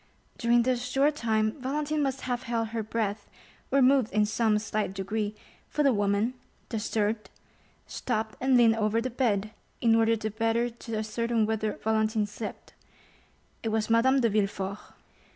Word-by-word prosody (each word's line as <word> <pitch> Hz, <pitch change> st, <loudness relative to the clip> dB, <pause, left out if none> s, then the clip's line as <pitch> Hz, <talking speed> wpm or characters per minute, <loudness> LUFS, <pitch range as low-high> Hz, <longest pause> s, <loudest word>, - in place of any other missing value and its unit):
During 235 Hz, -1 st, +4 dB
this 250 Hz, 0 st, 0 dB
short 270 Hz, +4 st, +2 dB
time 220 Hz, 0 st, 0 dB
Valentine 295 Hz, +3 st, -1 dB
must 270 Hz, -1 st, -1 dB
have 245 Hz, -1 st, -2 dB
held 230 Hz, -2 st, -2 dB
her 225 Hz, 0 st, -2 dB
breath, 215 Hz, -1 st, -3 dB, 0.4 s
or 275 Hz, -1 st, +4 dB
moved 260 Hz, -3 st, +4 dB
in 210 Hz, 0 st, +3 dB
some 215 Hz, 0 st, +2 dB
slight 210 Hz, -2 st, -2 dB
degree, 210 Hz, +2 st, -2 dB, 0.3 s
for 300 Hz, -, 0 dB
the 275 Hz, -3 st, +4 dB
woman, 205 Hz, +3 st, +1 dB, 0.4 s
disturbed, 215 Hz, -1 st, -1 dB, 0.6 s
stopped 220 Hz, -3 st, -3 dB
and 260 Hz, 0 st, +4 dB
leaned 230 Hz, -2 st, +5 dB
over 215 Hz, +1 st, +1 dB
the 255 Hz, +2 st, -3 dB
bed, 215 Hz, -4 st, 0 dB, 0.3 s
in 230 Hz, -2 st, +4 dB
order 225 Hz, 0 st, +4 dB
the 220 Hz, -1 st, -3 dB
better 225 Hz, +2 st, 0 dB
to 230 Hz, -1 st, -7 dB
ascertain 225 Hz, +1 st, 0 dB
whether 220 Hz, -1 st, -1 dB
Valentine 220 Hz, 0 st, +1 dB
slept: 205 Hz, +1 st, -8 dB, 0.9 s
it 225 Hz, -, -2 dB
was 220 Hz, 0 st, 0 dB
Madame 260 Hz, +4 st, +4 dB
de 230 Hz, -, +3 dB
Villefort. 200 Hz, -1 st, -1 dB
225 Hz, 155 wpm, -28 LUFS, 215-245 Hz, 0.9 s, leaned